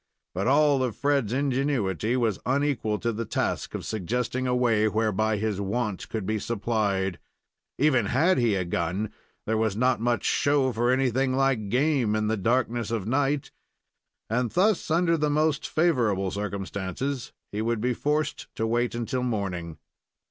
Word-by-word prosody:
But 95 +5 -1
all 145 0 +4
of 125 -5 -1
Fred's 140 -6 +1
ingenuity 130 - 0
was 115 -6 0
unequal 130 -5 0
to 120 - 0
the 115 +1 -3
task - - -2
of - - -5
suggesting 125 +5 -2
a 125 - +1
way 115 -4 +3
whereby 110 0 +1
his 105 -1 -1
want 105 0 -2
could 110 -4 -3
be 110 +2 -1
supplied. 100 -4 -1 0.6
Even 130 -7 +3
had 160 - +3
he 115 -4 +2
a 95 -2 -1
gun, 90 +5 -2 0.3
there 110 0 0
was 110 -3 +1
not 125 -1 +2
much 120 -3 +1
show 140 -2 +2
for 120 +2 +1
anything 130 0 +2
like 130 -6 +1
game 130 -3 +2
in 110 0 0
the 110 +1 +1
darkness 115 +1 0
of 115 -4 -2
night, 140 +3 0 0.8
and 120 +2 0
thus, 195 - +2
under 165 +1 +3
the 150 -1 +1
most 150 0 +1
favorable 115 - +1
circumstances, 100 +5 -4 0.2
he 105 - -2
would 115 0 0
be 125 +3 0
forced 150 +4 -1
to 110 - -1
wait 120 +1 0
until 120 +2 -2
morning. 95 -9 -3
120 Hz, 160 wpm, -26 LUFS, 105-135 Hz, 0.8 s, all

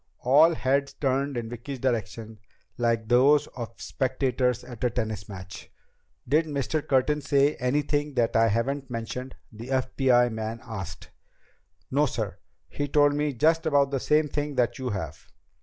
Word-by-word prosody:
All 155 +6 +6
heads 140 +1 0
turned 135 0 -1
in 115 -1 -3
Vicki's 120 +4 -6
direction, 115 -3 -3 0.4
like 115 -2 0
those 140 +5 +5
of 115 -2 -7
spectators 130 -2 -1
at 120 -3 -9
a 125 - +3
tennis 110 -4 -4
match. 95 -2 -9 0.6
"Did 155 +5 +2
Mr. 150 +1 -1
Curtin 145 +3 +2
say 140 0 +3
anything 145 +2 0
that 115 -2 +1
I 115 0 +5
haven't 130 +5 -1
mentioned?" 125 +2 -5 0.2
the 115 +2 -9
FBI 130 -2 +2
man 110 +1 -4
asked. 95 -6 -8 0.8
"No, - - +3
sir. - - -4 0.3
He 145 - -3
told 145 0 +4
me 150 0 0
just 160 +5 +2
about 140 -2 +3
the 135 - 0
same 150 +3 +2
thing 145 0 -3
that 125 +2 0
you 130 -1 -2
have." 80 - -5
130 Hz, 155 wpm, -26 LUFS, 115-145 Hz, 0.8 s, All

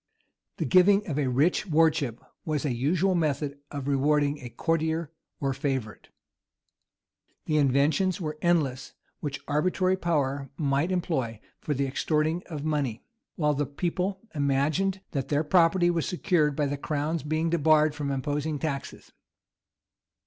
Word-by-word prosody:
The - - -1
giving 195 +3 +5
of 150 -3 -2
a 140 - +1
rich 145 +11 +2
wardship 150 -7 +2 0.2
was 155 -2 -2
a 135 - 0
usual 165 +10 +1
method 145 -4 -1
of 140 -2 -5
rewarding 145 +1 +2
a 125 - -8
courtier 160 +4 -1 0.3
or 135 -1 0
favorite. 135 -6 -3 1.4
The 155 - +1
inventions 150 +8 +2
were 155 -3 -4
endless 140 -7 0 0.3
which 140 -2 -4
arbitrary 185 +5 +1
power 140 -6 -1
might 145 +3 +1
employ 145 - -1 0.2
for 150 - -2
the 140 +1 0
extorting 155 +5 0
of 150 -4 -6
money, 145 -7 -1 0.3
while 150 -3 +1
the 145 0 -1
people 180 +6 -2
imagined 155 +7 +1
that 135 -3 -2
their 145 +1 +1
property 175 +2 +4
was 165 -2 -1
secured 160 -5 +1
by 150 - +1
the 140 0 -2
crown's 150 +3 -2
being 155 +3 -1
debarred 155 -2 +4
from 145 -1 -3
imposing 145 +2 -2
taxes. 140 -2 -5
150 Hz, 140 wpm, -27 LUFS, 140-165 Hz, 1.4 s, giving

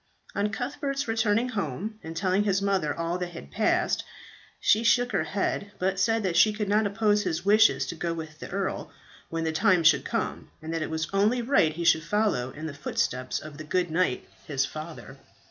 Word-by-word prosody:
On 205 +1 0
Cuthbert's 275 +5 -3
returning 225 +1 +1
home 205 - -4
and 165 0 -7
telling 190 +2 +2
his 195 -2 +2
mother 195 -6 0
all 170 +2 -2
that 175 -1 -4
had 70 - -10
passed, - - +1 0.6
she 220 +2 +3
shook 245 +2 +3
her 155 - 0
head, 200 +3 -2
but 190 +1 0
said 225 +2 +2
that 180 -3 -1
she 215 +3 +5
could 210 -1 -3
not 210 +1 +3
oppose 210 0 +2
his 165 -2 -2
wishes 215 +2 +5
to - - -4
go 170 +1 -3
with 160 -2 -7
the - - -8
earl 195 0 -3 0.4
when 165 0 -2
the 160 - 0
time 180 +1 +3
should 155 - +5
come, - - -3
and 160 +1 -6
that 165 - -1
it - - -2
was 160 0 -2
only 215 +5 +2
right 230 - +3
he 170 +2 -4
should 160 -1 +5
follow 205 - 0
in 150 +4 -8
the 155 - -4
footsteps 130 -2 -2
of 155 -1 -10
the - - -5
good 175 +2 0
knight 165 -6 0 0.2
his 135 -3 0
father. 155 -3 -9
185 Hz, 205 wpm, -27 LUFS, 160-210 Hz, 0.6 s, she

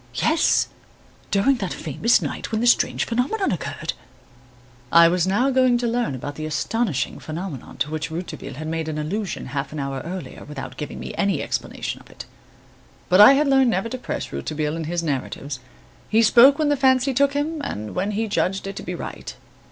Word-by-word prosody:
"Yes, 315 +1 +2 0.6
during 210 +7 +3
that 195 -6 -3
famous 190 - +1
night - - -4
when 220 - 0
the 235 - 0
strange 240 - +3
phenomenon 275 - 0
occurred." - - -3 1.0
I 170 0 +8
was 180 +1 +1
now 240 +8 +2
going 255 -2 +4
to 240 - -2
learn 235 - 0
about 145 +3 -5
the 155 +2 -5
astonishing 155 - -1
phenomenon 160 -4 -7
to 150 - -1
which 155 +1 -3
Rouletabille 170 -3 -6
had 155 +3 -6
made 160 0 -2
allusion 160 +7 -3
half 140 0 -3
an 155 - -5
hour 135 -1 -3
earlier 170 -5 -7
without 145 -2 -7
giving 150 -1 -6
me - - -6
any 195 -7 +1
explanation - - -4
of - - -19
it. - - -10 0.8
But 185 +3 +7
I 210 - +10
had 290 +2 +2
learned 270 -2 +4
never 225 +1 0
to 255 - -4
press - - -4
Rouletabille 155 0 -2
in 165 -1 -4
his 170 +1 -2
narratives. 140 -2 -3 0.5
He 225 +1 +4
spoke 255 +5 +7
when 305 -2 +1
the 290 - +3
fancy 260 0 +3
took 280 +2 +3
him 300 +2 -2
and 105 - -5
when 190 +3 -1
he 215 +2 -1
judged 195 -1 0
it 195 0 -5
to - - -4
be 180 - -5
right. - - -7
195 Hz, 190 wpm, -23 LUFS, 155-245 Hz, 1.0 s, I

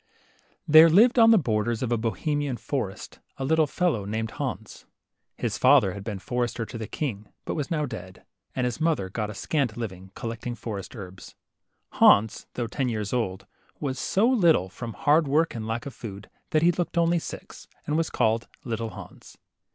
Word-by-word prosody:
T 155 +1 +8
here 165 +1 +9
lived 230 +9 +5
on 225 0 +8
the 225 - +7
borders 115 - 0
of 120 - -2
a - - +3
Bohemian 140 +4 -1
forest 115 -10 -5 0.2
a 135 - -3
httle 160 +1 +2
fellow 170 - 0
named 110 +2 -3
Hans. - - -6 0.5
His - - -2
father 95 - +5
had 100 - -8
been 105 -2 -4
forester 120 +2 -2
to 115 - -8
the 110 - -5
king, 110 -9 -4 0.2
hut - - -3
was 145 -4 -3
now 155 -3 0
dead; 95 -8 -9 0.3
and 125 - 0
his 125 +5 -3
mother 155 - +1
got 105 0 -3
a 105 - -7
scant 130 -2 -1
living,* 95 -5 -6
collecting 115 +1 -5
forest 105 -3 -6
herbs. 95 -4 -10 0.6
Hans, 105 +1 +4
though 120 - -1
ten 125 +3 -2
years 105 -2 -3
old, 95 -7 -2 0.3
was 130 -2 -3
so 200 - +2
little, 170 - +3
from 115 +3 -7
hard 150 +5 +3
work 155 +4 +2
and 110 -2 -5
lack 115 +1 -3
of 140 - -6
food, 105 -3 -9 0.2
that 155 0 +2
he 175 - +6
looked 175 0 -3
only 170 0 +3
six, - - -9 0.2
and 150 - -1
was 165 0 +1
called 110 +1 +1 0.2
Little 115 -2 -3
Hans. 95 - -12
120 Hz, 190 wpm, -26 LUFS, 110-155 Hz, 0.6 s, here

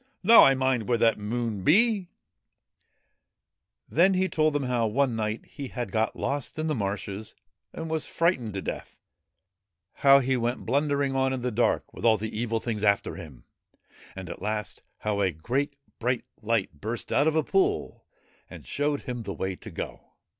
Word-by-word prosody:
Now 230 +5 +9
I 135 - +6
mind 130 -4 0
where 120 - +3
that 115 -1 +3
there 105 - -10
Moon 115 -3 -2
be! 200 - +4 0.8
' - - -51
Then 185 +4 +4
he 185 +1 +2
told 155 -3 +1
them 145 -1 0
how 125 -3 +1
one 125 +2 +1
night 110 0 -2
he 140 -2 -8
had 120 -5 -5
got 110 +2 0
lost 145 +2 -3
in 155 - -1
the 155 - 0
marshes 100 -2 -4 0.4
and 165 - -6
was 160 -1 -2
frightened 130 - 0
to 95 - -3
death; - - -6 1.0
how 140 0 +6
he 130 -1 +1
went 120 +1 -2
blundering 140 +1 +1
on 130 0 +2
in 130 -2 -4
the 125 - 0
dark 120 +2 0
with - - -10
all 110 -2 +5
the 110 +1 -5
Evil 115 0 -1
Things 110 -3 -3
after 100 -1 +2
him, 65 -6 -11 0.7
and, 95 -1 -7
at 85 - -8
last, 105 0 -3 0.2
how 105 -1 -1
a 95 - +3
great 130 - -2 0.2
bright 125 +1 -1 0.2
light 105 -9 -1
burst 115 +3 -4
out 145 - +3
of 160 - +2
a 160 - +3
pool 390 +2 0 0.5
and - - -11
showed 145 0 -1
him 125 -3 -5
the 100 -3 -5
way 95 +4 -3
to - - -10
go. - - -7
120 Hz, 185 wpm, -27 LUFS, 110-145 Hz, 1.0 s, Now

